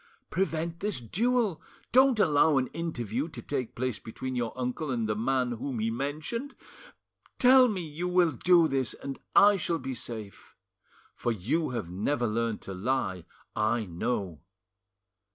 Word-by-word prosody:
"Prevent 170 -2 -1
this 205 -6 -2
duel; 220 - 0 0.3
don't 260 -1 +5
allow 150 -4 +4
an 130 -1 +1
interview 135 -5 -3
to - - -9
take 130 -5 -3
place 130 -2 -2
between 130 +3 -6
your 120 -2 -1
uncle 130 +5 -2
and 115 -4 -1
the 105 - 0
man 125 +2 0
whom 120 +2 -4
he 110 +1 0
mentioned. 155 - -4 0.8
Tell 255 0 +7
me 200 -6 -2
you 160 +4 -4
will 180 -2 +3
do 170 +5 +4
this, 135 -4 -1
and 140 -1 -7 0.2
I 205 0 +7
shall 170 -2 -1
be 135 -4 -5
safe; 115 -4 -8 0.6
for 120 - -1
you 120 - -1
have 110 -9 -4
never 120 +8 0
learned 115 0 -1
to 95 - -6
lie; 95 -4 -1 0.3
I 110 +1 +1
know." 90 -2 -3
130 Hz, 150 wpm, -29 LUFS, 115-170 Hz, 0.8 s, Tell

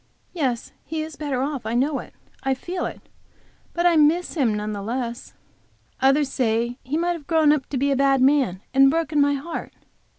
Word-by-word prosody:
Yes, 260 -9 -2
he 315 +1 -3
is 315 -1 -8
better 275 -4 -2
off; 280 -3 -3
I 220 +2 -2
know 275 +4 +1
it, - - -11 0.3
I 270 0 0
feel 355 +7 -4
it; - - -9 0.7
but 345 +1 -1
I 345 -2 +5
miss 315 +4 +3
him 270 -9 +2
none 210 0 -3
the 200 - -5
less. 235 +2 -4 0.6
Others 275 +2 +3
say 235 0 0
he 280 +5 -2
might 350 +1 +1
have 320 -5 -9
grown 315 -3 +4
up 280 -4 -2
to 275 - -2
be 280 +2 +1
a - - +2
bad 275 0 +3
man 260 -8 +2
and 270 0 +6
broken 315 -1 +1
my 285 0 +3
heart. 310 +5 -6
275 Hz, 200 wpm, -23 LUFS, 250-310 Hz, 0.7 s, and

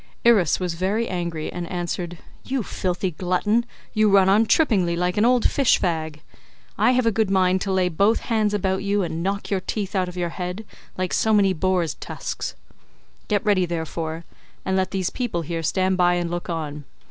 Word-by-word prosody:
Irus 210 -9 +4
was 180 -2 -2
very 195 +7 -1
angry 170 -3 -3
and 175 -1 -5
answered, 175 -1 -4 0.3
"You 260 -3 -2
filthy 180 -1 -2
glutton, 190 +8 0 0.3
you 215 -1 +3
run 195 -1 +5
on 215 +3 +4
trippingly 200 - +3
like 180 +1 0
an 210 - +3
old 245 -1 +4
fish 275 -4 +3
fag. 160 -3 -2 0.5
I 250 - +3
have 255 -1 +2
a 230 - +4
good 220 -1 +1
mind 185 -1 +2
to 195 - -2
lay 185 -1 +2
both 200 +6 +2
hands 215 -3 0
about 190 -1 0
you, 200 0 +1
and 165 -1 -3
knock 200 +3 -2
your 195 - +2
teeth 200 +1 -4
out 185 -1 +1
of 180 - -10
your 175 -1 -1
head 180 +5 -5 0.3
like 185 -1 -2
so 220 -1 +3
many 195 -2 +4
boar's 180 -2 0
tusks. - - -5 0.7
Get 210 +1 0
ready, 190 -4 +3
therefore, 160 0 -4 0.4
and 190 - 0
let 190 -1 +1
these 190 -2 -2
people 220 -10 -2
here 165 +1 -3
stand 185 +3 +1
by 175 -1 +4
and 175 -1 -2
look 175 0 -4
on. 150 -3 -4
185 Hz, 195 wpm, -23 LUFS, 175-205 Hz, 0.7 s, run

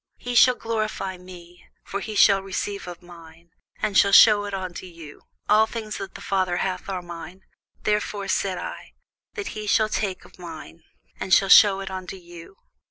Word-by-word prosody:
He 245 - -6
shall 250 +1 +6
glorify 215 -5 -3
me: 175 -1 -14 0.2
for - - -5
he 215 +1 -6
shall 200 -1 +5
receive 195 0 -5
of 175 -1 -9
mine, 170 -1 -16 0.3
and 210 -2 -1
shall 200 +1 +5
shew 205 0 +7
it 205 - -6
unto 185 -1 -6
you. 165 -4 -13 0.3
All 215 +1 +4
things 220 -2 -6
that 195 - -8
the - - -9
Father 185 -2 -1
hath 185 +1 -3
are 185 -2 -4
mine: 175 +2 -10 0.4
therefore 210 -1 -1
said 190 -2 -1
I, - - -8 0.4
that 410 -3 -5
he 215 0 -7
shall 215 +1 +2
take 195 -3 -3
of - - -19
mine, 165 -1 -10 0.4
and 190 - -5
shall 195 +2 +5
shew 195 -1 +7
it 190 -1 -6
unto 185 0 -6
you. 175 0 -13
190 Hz, 180 wpm, -23 LUFS, 175-210 Hz, 0.4 s, shew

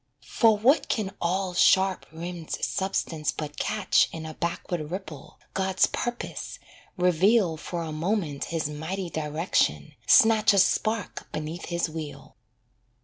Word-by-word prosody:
For 225 -4 +3
what 255 +9 +3
can 200 -4 -1
all 185 +2 0
sharp 190 +1 +3
rimmed 170 0 -7
substance 170 -5 -1
but 150 -1 -7
catch 210 -3 +2
In 160 -1 -7
a 155 - -6
backward 170 -2 -3
ripple, 160 -6 -8 0.2
God's 190 -1 +2
purpose, 240 0 -4 0.4
reveal 180 +1 +3
For 170 +2 -5
a 160 - -5
moment 160 -2 -2
His 165 -2 -2
mighty 165 +5 -5
direction, 155 +3 0
snatch 220 -1 +6
A - - +2
spark 215 +2 0
beneath 155 +3 -5
His 170 0 -1
wheel. 155 -2 -8
175 Hz, 130 wpm, -26 LUFS, 160-195 Hz, 0.4 s, snatch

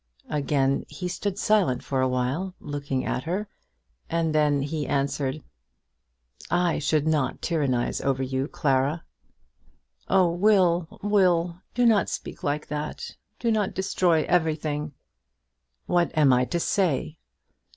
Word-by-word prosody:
Again 140 -2 +1
he 180 - -5
stood 185 +2 -3
silent 200 - +2
for 135 -2 -1
awhile, 130 +9 -1
looking 140 -3 -3
at - - -1
her, 190 +6 -2 0.6
and 165 -1 0
then 150 -2 +2
he 150 +1 -3
answered: 140 +1 -1 1.1
"I 175 -2 +1
should 150 0 +1
not 150 -5 0
tyrannise 140 -8 0
over 135 -1 0
you, 130 +1 -2
Clara." 145 +1 0 1.0
"Oh, 185 -3 +4
Will, 180 -3 +2
Will, 180 -4 +2
do 245 0 +3
not 220 -3 +4
speak - - -6
like 145 +1 -1
that. 150 0 -5 0.2
Do 235 - 0
not 215 -3 0
destroy 180 -4 +2
everything." 155 -3 0 0.9
"What 175 -1 +2
am 145 -4 +5
I 125 0 +3
to 170 - -2
say?" 165 -4 0
155 Hz, 125 wpm, -25 LUFS, 140-180 Hz, 1.1 s, am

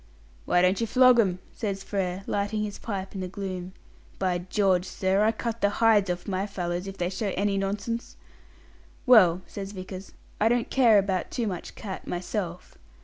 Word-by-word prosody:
"Why 175 - +3
don't 185 +4 +3
you 230 - 0
flog 255 +1 +6
'em?" 190 -5 +2 0.2
says 195 -4 -3
Frere, 190 -2 -2
lighting 205 +1 -1
his 205 -1 -5
pipe 195 -4 -5
in 195 - -4
the 185 - -3
gloom. 185 -1 -5 0.4
"By 185 -2 0
George, 185 0 +1
sir, 190 +2 +1
I 220 - +4
cut 230 0 -4
the 205 - +4
hides 215 -4 +4
off 175 0 -3
my 195 0 -1
fellows 180 -2 -3
if 195 0 -7
they 175 - 0
show 195 +2 -2
any 200 +1 +1
nonsense!" 205 +4 -3 0.9
"Well," 185 -8 +6
says 200 0 -7
Vickers, 185 0 -8 0.3
"I 220 - +4
don't 240 0 0
care 235 -5 +5
about 190 -2 0
too 240 - -2
much 185 -5 -5
cat 195 -4 -7
myself. 180 0 -4
195 Hz, 180 wpm, -27 LUFS, 185-215 Hz, 0.9 s, flog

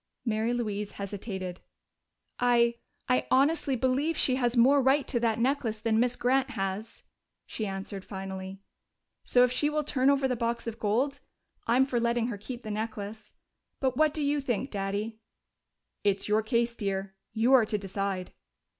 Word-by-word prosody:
Mary 225 0 0
Louise 210 -4 -2
hesitated. 195 -2 -5 0.8
"I 235 -1 +3 0.3
I 250 - +2
honestly 280 +1 +3
believe 265 +6 +1
she 260 - +3
has 245 -1 +1
more 270 +4 +6
right 270 +2 +3
to 240 - 0
that 230 -2 +1
necklace 235 -3 0
than 220 0 +1
Miss 245 +1 +2
Grant 265 +2 +2
has," 200 -1 -4 0.4
she 215 - -4
answered 195 0 -5
finally. 190 0 -7 0.6
"So, 245 - +4
if 250 - +3
she 295 +3 +2
will 300 0 0
turn 275 -2 +2
over 275 -1 +3
the 250 - 0
box 235 0 -2
of 230 0 -5
gold, 255 +7 0 0.5
I'm 250 +3 +4
for 250 -3 0
letting 235 0 +1
her 220 - -4
keep 240 +4 -7
the 215 - -5
necklace.... 215 0 -5 0.5
But 260 -2 0
what 310 +2 +4
do 300 0 -2
you 290 0 +1
think, 260 0 -2
Daddy?" 205 +2 -3 0.8
"It's 200 -1 +1
your 210 +1 +3
case, 235 +1 0
dear. 195 -2 -3 0.2
You 235 +4 +3
are 240 -5 +6
to 210 - 0
decide." 195 -1 -3
235 Hz, 165 wpm, -29 LUFS, 205-260 Hz, 0.8 s, more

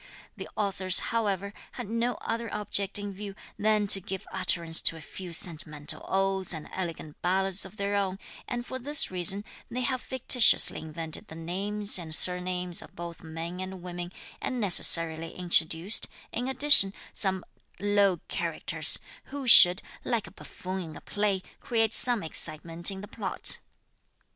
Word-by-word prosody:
The - - -9
authors, 195 -3 +1
however, 200 -3 -2 0.2
had - - -7
no 230 +2 -2
other 230 -1 -4
object 200 -1 -2
in 205 -1 -6
view 200 0 -8 0.2
than 215 0 +1
to 195 -1 +8
give 190 +2 -6
utterance 165 -1 +2
to 165 - +2
a - - -10
few 180 +3 -9
sentimental 155 -3 -1
odes 190 -2 0
and 155 - -9
elegant 165 -4 -7
ballads 190 +1 0
of 190 +3 -13
their 200 0 -2
own, 195 -2 -2 0.3
and 240 -1 -5
for 260 - -7
this 295 +1 +2
reason 185 +3 +1 0.2
they 245 +2 -4
have 255 0 -2
fictitiously 255 -3 +4
invented 160 0 -5
the 160 - -11
names 200 +5 0
and 160 -2 -2
surnames 180 0 0
of - - -15
both 170 -1 -9
men 165 +2 -7
and 185 -1 -7
women, 175 0 -7 0.3
and 255 - -3
necessarily 165 -5 +3
introduced, 175 +2 +3 0.2
in 245 +2 -4
addition, 265 -7 +6 0.2
some 190 -2 +1 0.3
low 200 -3 +1
characters, - - 0 0.3
who 280 -2 -7
should, 180 -4 +8 0.2
like 230 -4 -2
a - - -12
buffoon 185 +1 -8
in 160 -3 -9
a - - -11
play, 205 -3 -2 0.2
create 225 -2 0
some 245 -5 +3
excitement 165 +2 0
in 190 -1 -7
the 205 - -9
plot. 200 -3 -3
190 Hz, 155 wpm, -27 LUFS, 175-210 Hz, 0.3 s, to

